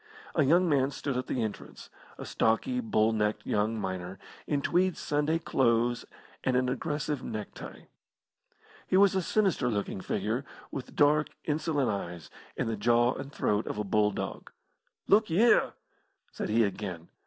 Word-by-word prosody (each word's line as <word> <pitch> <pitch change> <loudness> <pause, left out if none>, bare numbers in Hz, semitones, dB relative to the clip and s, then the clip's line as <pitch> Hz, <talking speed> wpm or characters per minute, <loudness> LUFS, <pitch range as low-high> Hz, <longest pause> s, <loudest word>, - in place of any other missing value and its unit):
A 160 - +2
young 170 +6 +4
man 140 -4 +2
stood 140 -1 -4
at 125 - -2
the 125 - -1
entrance 110 -2 -7 0.3
a - - -7
stocky, 250 - +1
bull 115 - +2
necked 105 -1 -1
young 110 +2 0
miner, 95 -1 -4 0.3
in 145 -2 0
tweed 185 0 +2
Sunday 150 +2 0
clothes 120 -6 +1 0.4
and 130 -1 +2
an 125 0 +1
aggressive 145 +1 -2
neck 105 -2 -5
tie. - - -10 1.0
He 185 - +3
was 200 -1 +6
a 190 - +1
sinister 190 -7 +1
looking 100 -3 -2
figure, 110 +8 -2 0.3
with 135 - -7
dark, 150 +1 +4 0.2
insolent 150 -4 0
eyes, 85 -5 -6 0.3
and - - -1
the 115 - -1
jaw 120 +3 +3
and 135 +1 -7
throat 105 -5 0
of - - -4
a 105 - -1
bulldog. 105 0 -1 0.5
"Look 215 +1 +4
y'ere!" 215 +9 +4 0.6
said - - -4
he 115 +2 +4
again. 95 -5 -4
125 Hz, 155 wpm, -29 LUFS, 105-150 Hz, 1.0 s, was